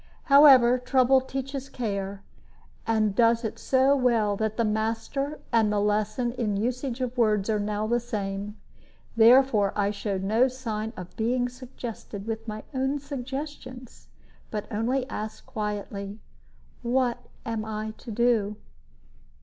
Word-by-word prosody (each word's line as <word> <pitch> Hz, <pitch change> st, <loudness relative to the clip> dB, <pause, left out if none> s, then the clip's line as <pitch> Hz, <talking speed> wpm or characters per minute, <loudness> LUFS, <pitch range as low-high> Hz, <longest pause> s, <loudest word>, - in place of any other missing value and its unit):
However, 270 Hz, -4 st, +7 dB
trouble 260 Hz, +1 st, +4 dB
teaches 270 Hz, +1 st, -5 dB
care, 200 Hz, -5 st, -4 dB, 0.6 s
and 215 Hz, -2 st, +2 dB
does 230 Hz, +1 st, +3 dB
it 220 Hz, -, -4 dB
so 265 Hz, +1 st, +3 dB
well 230 Hz, -6 st, +2 dB
that 220 Hz, +1 st, -2 dB
the 230 Hz, -, +2 dB
master 225 Hz, +7 st, -2 dB
and 220 Hz, -2 st, +4 dB
the 210 Hz, -, +1 dB
lesson 215 Hz, +4 st, 0 dB
in 220 Hz, -5 st, -1 dB
usage 250 Hz, +3 st, -2 dB
of 250 Hz, -1 st, -2 dB
words 215 Hz, -2 st, +2 dB
are 210 Hz, -, +1 dB
now 210 Hz, +1 st, -1 dB
the 240 Hz, +2 st, +1 dB
same; 205 Hz, -3 st, -4 dB, 0.6 s
therefore 230 Hz, -3 st, +5 dB
I 205 Hz, -1 st, +1 dB
showed 200 Hz, -2 st, -3 dB
no 220 Hz, +6 st, +3 dB
sign 225 Hz, -4 st, -4 dB
of 180 Hz, -1 st, -9 dB
being 245 Hz, +2 st, 0 dB
suggested 240 Hz, -5 st, -8 dB
with 225 Hz, 0 st, -4 dB
my 215 Hz, 0 st, -5 dB
own 265 Hz, +2 st, 0 dB
suggestions, 270 Hz, -2 st, -7 dB, 0.4 s
but 210 Hz, -2 st, -4 dB
only 250 Hz, +5 st, 0 dB
asked, 215 Hz, +1 st, -6 dB
quietly, 205 Hz, -1 st, -5 dB, 0.6 s
"What 245 Hz, 0 st, +1 dB, 0.3 s
am 225 Hz, -1 st, -2 dB
I 215 Hz, 0 st, -4 dB
to 245 Hz, -, -10 dB
do?" 225 Hz, -2 st, +1 dB
230 Hz, 135 wpm, -26 LUFS, 210-255 Hz, 0.6 s, However